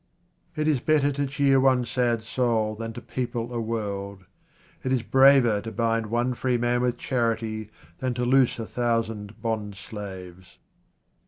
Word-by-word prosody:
It 155 0 -1
is 150 -4 +3
better 145 +1 +2
to 140 0 -1
cheer 135 0 +3
one 130 -2 +3
sad 120 -2 0
soul 115 -2 0
than 115 +1 -5
to 120 - -8
people 120 0 -4
a 120 - -1
world. 100 -4 -4 0.6
It 130 - -1
is 125 -3 +1
braver 130 -4 +5
to 115 - -6
bind 115 -1 0
one 120 +3 0
free 125 0 0
man 120 +1 +1
with 125 -1 0
charity 115 -4 -1 0.3
than 130 -2 -2
to 125 0 -1
loose 130 0 +3
a 115 - -4
thousand 115 -3 -2
bond 110 -3 -2
slaves. 95 -4 -9
120 Hz, 160 wpm, -25 LUFS, 110-125 Hz, 0.6 s, braver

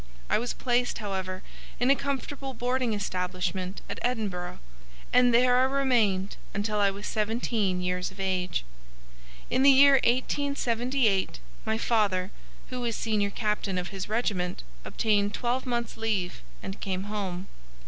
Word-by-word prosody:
I - - +4
was 240 +2 -2
placed, 245 -1 0
however, 190 -3 -4 0.4
in 250 +2 +4
a - - +6
comfortable 275 -1 -4
boarding 250 -1 0
establishment 185 -1 -2
at - - -5
Edinburgh, 205 -8 -2 0.6
and 250 0 +6
there 245 +1 +5
I - - +5
remained 235 -8 +1 0.2
until 210 +1 0
I 200 -1 +4
was 200 +1 -6
seventeen 215 -3 0
years 180 0 -1
of 190 +1 -15
age. 185 - -1 0.9
In 260 - +3
the 275 - +8
year 275 0 +8
1878 245 -4 +1 0.3
my 220 - 0
father, 205 -5 +1 0.4
who 250 -1 -3
was 235 -2 -1
senior 210 -3 0
captain 210 -2 -1
of 180 -1 -2
his 195 -1 -5
regiment, 200 -6 -1 0.2
obtained 205 -2 +1
twelve 250 +2 -1
months' 235 -2 -2
leave 210 - -1 0.2
and 195 - -6
came 190 -2 -2
home. 195 -3 -4
215 Hz, 140 wpm, -28 LUFS, 190-245 Hz, 0.9 s, the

